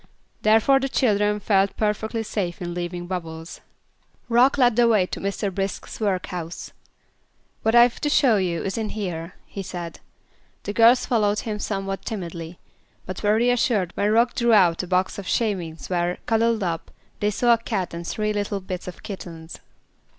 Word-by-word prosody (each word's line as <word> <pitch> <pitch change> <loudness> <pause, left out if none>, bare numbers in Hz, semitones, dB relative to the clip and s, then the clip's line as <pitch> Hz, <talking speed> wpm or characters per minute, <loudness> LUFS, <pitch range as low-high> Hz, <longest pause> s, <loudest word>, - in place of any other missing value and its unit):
Therefore 225 +6 +4
the 270 0 -2
children 210 -5 +2
felt 195 -1 +2
perfectly 220 +1 -1
safe 190 -5 -3
in 175 -1 -4
leaving 175 0 -4
Bubbles. 165 -2 -6 0.7
Rock 245 +4 +4
led 245 -4 +4
the 240 0 +5
way 215 -5 +4
to - - -6
Mr. 200 0 -2
Brisk's 195 +1 -4
workhouse. 180 -5 -3 0.9
"What 225 +1 +2
I've 240 0 +5
to 295 - +1
show 260 -7 +4
you 175 -4 -1
is 195 +3 -2
in 220 -1 -2
here," 175 -5 -5
he 200 - -7
said. 175 -3 -6 0.6
The 205 - -4
girls 235 +3 +5
followed 210 -3 +1
him 215 -2 -4
somewhat 195 -2 -3
timidly, 170 -4 -6 0.5
but 185 - -6
were 210 0 +3
reassured 230 -5 +2
when 205 - +1
Rock 235 +3 +3
drew 235 -1 +2
out 180 -5 +5
a 180 - -7
box 185 +2 0
of 195 - -7
shavings 180 -9 -1
where, 175 0 0
cuddled 225 -1 +2
up, 165 -2 -3 0.3
they 210 - +1
saw 240 +3 +3
a 230 - +1
cat 200 -7 -3
and 170 0 -6
three 215 0 -1
little 205 -1 -2
bits 185 -1 -6
of 180 - -9
kittens. 170 -6 -8
200 Hz, 170 wpm, -23 LUFS, 180-225 Hz, 0.9 s, the